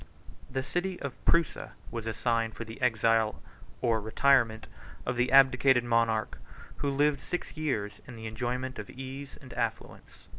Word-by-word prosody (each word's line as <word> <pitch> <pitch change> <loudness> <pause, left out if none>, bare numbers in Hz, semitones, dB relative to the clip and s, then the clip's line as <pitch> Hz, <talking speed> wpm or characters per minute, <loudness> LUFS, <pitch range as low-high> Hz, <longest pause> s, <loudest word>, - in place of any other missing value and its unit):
The 130 - -2
city 175 +5 -2
of 140 -2 -4
Prusa 170 -2 +1 0.2
was 115 -1 -4
assigned 115 0 0
for 115 - -6
the 115 +2 -10
exile 115 -2 +2 0.4
or 115 -2 +2
retirement 115 0 +3 0.4
of 125 - -1
the 125 +1 +1
abdicated 130 -2 +6
monarch, 115 -2 +1 0.4
who 140 - -1
lived 145 +1 +2
six 180 - -4
years 130 -10 -2
in 125 - -9
the 110 0 -8
enjoyment 125 +3 -3
of 105 - -7
ease 135 +1 -8
and 130 - -10
affluence. - - -5
125 Hz, 150 wpm, -29 LUFS, 115-135 Hz, 0.4 s, abdicated